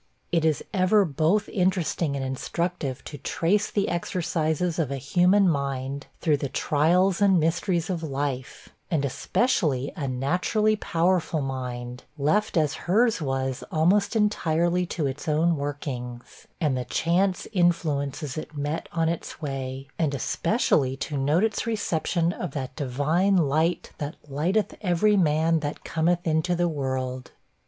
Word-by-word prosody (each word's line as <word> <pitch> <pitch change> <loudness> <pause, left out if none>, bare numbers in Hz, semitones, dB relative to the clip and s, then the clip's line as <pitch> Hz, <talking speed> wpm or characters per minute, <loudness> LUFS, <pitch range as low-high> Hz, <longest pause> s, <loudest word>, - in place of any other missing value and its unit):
It 165 -2 +2
is 160 -2 +1
ever 195 +2 +4
both 165 +7 +1
interesting 180 -5 0
and 135 -1 -2
instructive 140 +1 -3
to 145 - -8
trace 200 +10 +1
the 200 -1 0
exercises 170 -1 -1
of 155 -5 0
a 140 - -2
human 180 +8 +3
mind, 140 -2 -2
through 155 -4 +3
the 140 -1 -3
trials 170 +8 +2
and 195 -3 +5
mysteries 170 +1 0
of 180 -3 -2
life; 135 -3 -4 0.2
and 150 -4 +1
especially 140 - 0
a 140 - -3
naturally 180 - +1
powerful 170 -3 +1
mind, 125 -2 -5
left 170 +8 +1
as 150 -3 +2 0.2
hers 225 0 +3
was 135 -2 -2
almost 195 +7 +2
entirely 180 -4 +1
to 160 -3 -2
its 140 +5 -4
own 160 +2 +3
workings, 135 -4 -6
and 150 -6 +1
the 125 -1 -2
chance 180 +3 +1
influences 155 -5 0
it 155 -1 -9
met 145 +3 -3
on 165 -1 +1
its 165 -1 -4
way; 135 -2 -4
and 150 -4 +1
especially 135 - +1
to 145 - -4
note 145 +7 +2
its 220 +1 0
reception 175 -5 0
of 175 -6 -5
that 130 -2 -5
divine 155 +8 +1
'light, 160 +2 +1
that 145 +2 -4
lighteth 170 +10 0
every 205 +2 +3
man 160 -2 +3
that 150 -1 -5
cometh 170 +2 0
into 160 +2 +1
the 175 0 +1
world.' 130 -4 -3
160 Hz, 145 wpm, -26 LUFS, 140-180 Hz, 0.2 s, and